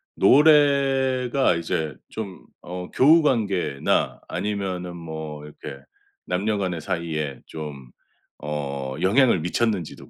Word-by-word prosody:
노래가 135 - +4
이제 80 -4 -2
좀 100 -5 -7 0.2
어 90 0 -7
교우 160 +5 +6
관계나 100 - 0
아니면은 95 -4 -3
뭐 80 -2 -7
이렇게 70 -2 -10 0.4
남녀 100 +4 -1
간의 90 -4 -2
사이에 80 -6 -3
좀 70 -5 -8 0.5
어 70 -3 -4
영향을 115 - +4
미쳤는지도 95 -1 -2
90 Hz, 220 characters per minute, -24 LUFS, 75-120 Hz, 0.5 s, 교우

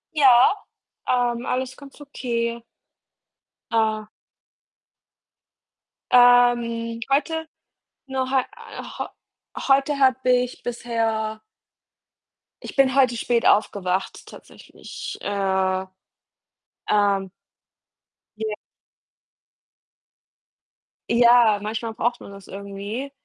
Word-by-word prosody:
Ja, 260 -2 +6 0.5
ähm, 245 -1 0
alles 260 0 -2
ganz 280 0 -14
okay. 235 -4 -3 1.1
Ah. 220 -1 0 2.0
Ähm, 240 -2 +4
heute 320 +3 0 0.6
nur 260 -1 -2
heu 265 -1 +3
äh, 460 - -10 0.2
heu - - -2 0.6
heute 275 +1 +3
habe 260 -1 +3
ich 250 0 +1
bisher 225 -2 -2 1.3
ich - - -9
bin 265 -1 +4
heute 255 -3 +3
spät 235 0 0
aufgewacht 195 -3 +1
tatsächlich, - - -10
äh, 190 -1 0 1.0
ähm. 200 -2 +2 1.1
Ja. 215 -1 -3 2.5
Ja, 235 -3 +5
manchmal 225 +2 -4
braucht 240 +2 -1
man - - -11
das 200 -1 -13
irgendwie. 200 +7 -6
235 Hz, 80 wpm, -23 LUFS, 215-260 Hz, 2.5 s, Ja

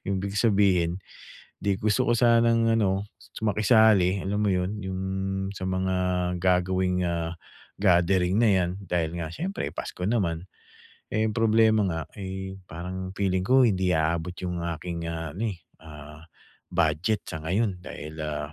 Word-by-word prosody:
Ibig 100 0 -2
sabihin 95 -6 +3 0.7
hindi, 100 -1 0
gusto 110 +4 +2
ko - - +4
sanang 115 -1 +4
ano 100 -1 0
su - - -13
makisali, 105 -3 +4
alam 100 +2 -1
mo 100 - +2
'yon, 90 +3 -1
'yong 95 0 -4 0.5
sa 95 - -6
mga 95 0 0 0.4
gagawing, 90 0 +1
ah, 85 -1 -2 0.5
gathering 90 0 +3
na 115 -1 +4
'yan 90 -2 +2
dahil 85 -2 -1
nga 80 - -3
siyempre 190 - -4
pasko 90 - -6
naman. 90 -6 0 0.7
Eh, 110 +1 +1
ang 105 - -5
problema 110 -1 +4
nga, 80 -3 -2 0.2
eh, 95 0 -5
parang 95 +3 -6
feeling 95 -2 0
ko 130 +1 +5
hindi 95 -2 +1
aabot 80 +2 0
'yong 90 -2 -4
aking, 85 -2 -5
ah, 80 -2 -5
ano, 110 0 -1
eh, 90 - -12 0.3
ah, 75 0 -11 0.5
budget 85 +7 +1
sa 80 - -6
ngayon 95 +4 0
dahil, 75 -3 -8
ah, 75 -1 -4
95 Hz, 150 wpm, -26 LUFS, 85-105 Hz, 0.7 s, ko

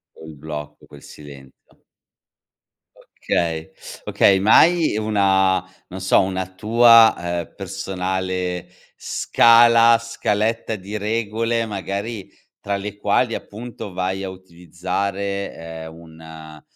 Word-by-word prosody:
Quel 80 -1 -12
blocco, 75 0 -9
quel 70 - -15
silenzio. 70 -3 -15 1.4
Okay, 80 -2 -2 0.3
okay, 95 -1 +3
ma 105 +3 +5
hai 170 -8 +2
una 95 -3 +2 0.3
non 95 - -8
so, 95 - +3
una 95 -1 -2
tua, 115 +3 +6 0.3
ehm, 80 - -16
personale 90 -1 -4 0.3
scala, 115 0 +4
scaletta 115 0 -2
di 100 +2 -7
regole, 115 +2 -2
magari, 100 +1 -5 0.3
tra 100 0 -3
le 100 +1 -6
quali 105 +4 0
appunto 110 -2 -8
vai 95 +1 -3
a 95 - -5
utilizzare, 95 +2 -5
ehm, 80 -1 -9
un 80 -1 -13
95 Hz, 105 wpm, -20 LUFS, 85-110 Hz, 1.4 s, tua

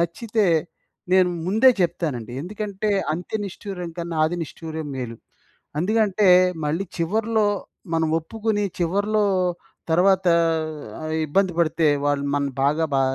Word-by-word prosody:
నచ్చితే, 210 +5 0 0.7
నేను 185 -1 +5 0.2
ముందే 220 +7 +5
చెప్తానండి. 135 -9 -2
ఎందుకంటే, 210 +2 -4 0.2
అంత్య 180 +6 -3
నిష్ఠూరం 180 -2 -6
కన్నా 170 -1 -4
ఆది 175 +3 -1
నిష్టూరం 160 0 -6
మేలు. 120 -3 -5 0.6
అందుకంటే, 210 +1 +2 0.4
మళ్ళీ 165 +6 -1
చివర్లో 215 +5 +1 0.5
మనం 160 -1 +1
ఒప్పుకుని, 210 +4 -2
చివర్లో 205 +5 +1 0.7
తర్వాత 190 +3 +4 0.8
ఆహ్, 155 0 -4
ఇబ్బంది 185 +4 +1
పడితే 165 -1 +2 0.2
వాళ్ళు 145 -1 +1
మనల్ని 140 -1 -1
బాగా 150 +3 +2
బా 135 - +3
180 Hz, 115 wpm, -23 LUFS, 160-205 Hz, 0.8 s, నేను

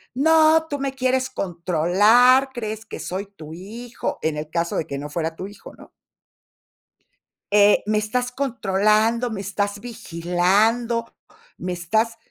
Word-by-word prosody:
"¡No, 320 +3 +4
tú 285 -2 -4
me 275 -1 -2
quieres 260 0 0
controlar, 200 - +3
crees 220 -3 -5
que - - -7
soy 190 +3 -5
tu 160 -6 -12
hijo!". 225 +8 -6
En 155 -1 -1
el 150 0 -5
caso 170 +1 -2
de 160 - -2
que 140 - -5
no 145 +1 -6
fuera 160 +1 -3
tu 185 - -6
hijo, 200 0 -12
¿no? - - -16 1.6
eh, 205 0 +5
"¡me 215 - +1
estás 245 +4 -1
controlando, 225 -2 +1
me 205 -3 -4
estás 200 +1 -2
vigilando, 220 +3 0 0.5
me 180 0 -4
estás" 220 +7 -1
210 Hz, 140 wpm, -22 LUFS, 180-245 Hz, 1.6 s, eh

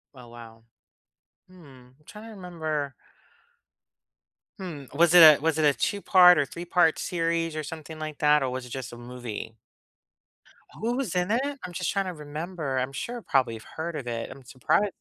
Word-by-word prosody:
Oh, 125 -2 -13
wow. 115 -1 -13 0.9
Mm, 140 -9 -16
I'm 150 - -30
trying 210 +5 -11
to - - -10
remember 160 -8 -4 1.7
hmm, 160 -8 -7
was 170 +2 +4
it 175 - +9
a 155 -2 +9
was 160 +1 0
it 155 - +3
a 145 - +5
2 205 - -1
part 180 -2 +7
or 145 - +2
3 170 +5 -8
part 175 -2 +3
series 165 -1 -1
or 155 - -2
something 155 +1 -8
like 155 -1 -6
that, 150 0 +4
or 135 - -1
was 130 0 -5
it - - -11
just 130 0 -6
a 120 - -10
movie? 120 -2 -7 1.2
Who 235 +2 -2
was 245 -10 -3
in 180 +2 0
it? 235 +3 +2 0.2
I'm 180 - -6
just 175 0 -2
trying 195 -1 -1
to 185 - -4
remember, 150 -1 -5
I'm 130 +1 -1
sure 235 - -5
probably 130 - +1
I've 110 - -11
heard 160 +1 -6
of 140 - -5
it, 115 -1 -4
I'm 135 - -12
surpri 130 +11 0
155 Hz, 190 wpm, -26 LUFS, 130-180 Hz, 1.7 s, it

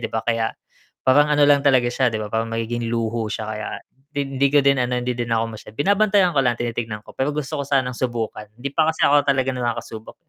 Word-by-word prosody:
'di - - -3
ba 110 - 0
kaya 115 -1 +1 0.6
parang 145 +3 +5
ano 145 0 +5
lang 140 -1 +5
talaga 130 -3 +4
siya 125 +1 +1
'di 110 - -2
ba 105 - -4
parang 115 0 -1
magiging 115 +1 -2
luho 115 -1 -1
siya 110 - -4
kaya, 110 0 -4 0.5
hindi 135 0 +1
ko 145 - +6
din 140 -1 +4
ano 125 0 -1
hindi 125 0 -2
din 120 -1 -4
ako 115 0 +2
masyad 105 0 -13
binabantayan 200 0 +3
ko 135 - +4
lang, 120 -1 +2
tinitingnan 115 -2 -3
ko - - -12
pero 135 +3 0
gusto 150 0 -3
ko - - -5
sanang 130 -3 +1
subukan, 115 -4 -3
hindi 130 +4 -5
pa 160 0 +3
kasi 160 - 0
ako 145 0 +5
talaga 135 -1 +2
nakakasubok. 115 -2 -4
125 Hz, 230 wpm, -22 LUFS, 115-140 Hz, 0.6 s, ko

